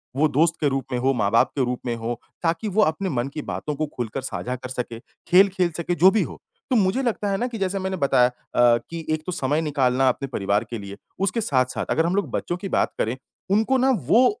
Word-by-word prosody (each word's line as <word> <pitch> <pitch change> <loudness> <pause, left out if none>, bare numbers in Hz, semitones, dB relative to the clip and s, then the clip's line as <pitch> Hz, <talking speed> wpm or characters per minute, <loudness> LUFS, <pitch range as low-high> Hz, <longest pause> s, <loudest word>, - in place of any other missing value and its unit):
वो 155 +3 +3
दोस्त 155 +3 +2
के 150 - +3
रूप 135 -2 -2
में 125 - 0
हो, 135 +2 +2
माँ-बाप 115 -1 +2
के 135 -3 +1
रूप 125 0 -2
में 120 -1 -1
हो, 115 +1 -4 0.2
ताकि 165 +5 0
वो 210 +1 +2
अपने 185 +4 0
मन 125 -3 -1
की 150 - -4
बातों 150 0 -4
को 155 +2 -1
खुलकर 120 +2 -3
साझा 125 -1 -4
कर 130 0 -8
सके, 120 -2 -5 0.3
खेल 190 +3 +7
खेल 180 -2 0
सके, 175 +1 -1
जो 180 +4 +6
भी 220 - +2
हो। - - -8 0.3
तो 260 - +2
मुझे 205 +3 +2
लगता 215 -4 -1
है 195 - +1
ना 245 - -1
कि 240 -2 -6
जैसे 195 -1 -1
मैंने 190 0 -3
बताया 135 -5 +4
अ, 120 -1 +2
कि 165 -1 -6
एक 155 0 -1
तो 180 - -3
समय 150 -1 0
निकालना 135 -4 +2
अपने 135 +2 -2
परिवार 105 -4 0
के 120 - -4
लिए, 100 0 -8 0.2
उसके 195 +4 0
साथ-साथ 130 - 0
अगर 160 - +2
हम 175 +2 0
लोग 200 - 0
बच्चों 175 - -2
की 195 +2 -6
बात - - +1
करें, 115 +3 0 0.4
उनको 220 +6 +3
ना 260 +1 +3 0.2
वो 245 +3 +6
150 Hz, 245 wpm, -23 LUFS, 125-190 Hz, 0.4 s, खेल